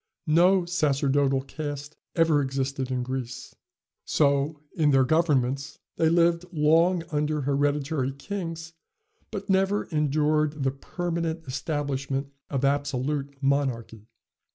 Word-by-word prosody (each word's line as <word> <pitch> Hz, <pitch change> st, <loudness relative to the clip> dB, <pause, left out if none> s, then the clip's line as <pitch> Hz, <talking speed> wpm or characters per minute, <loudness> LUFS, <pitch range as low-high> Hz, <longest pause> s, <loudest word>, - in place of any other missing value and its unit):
No 175 Hz, +3 st, +4 dB
sacerdotal 140 Hz, -5 st, +1 dB
caste 145 Hz, 0 st, -6 dB, 0.2 s
ever 165 Hz, -3 st, +4 dB
existed 135 Hz, -1 st, -2 dB
in 125 Hz, -1 st, -1 dB
Greece. 130 Hz, 0 st, -5 dB, 0.5 s
So, 140 Hz, +1 st, +1 dB, 0.2 s
in 155 Hz, -5 st, +3 dB
their 135 Hz, -2 st, +5 dB
governments, 140 Hz, -2 st, +1 dB, 0.2 s
they 160 Hz, -, +3 dB
lived 170 Hz, 0 st, +3 dB
long 165 Hz, +2 st, +3 dB
under 150 Hz, 0 st, 0 dB
hereditary 145 Hz, 0 st, 0 dB
kings, 165 Hz, +1 st, -6 dB, 0.6 s
but 200 Hz, 0 st, -6 dB
never 195 Hz, +1 st, +2 dB
endured 150 Hz, 0 st, +1 dB
the 135 Hz, -, +2 dB
permanent 165 Hz, +3 st, -3 dB
establishment 140 Hz, 0 st, -3 dB, 0.2 s
of 135 Hz, -1 st, 0 dB
absolute 140 Hz, 0 st, -1 dB
monarchy. 125 Hz, -6 st, -1 dB
145 Hz, 105 wpm, -26 LUFS, 135-160 Hz, 0.6 s, their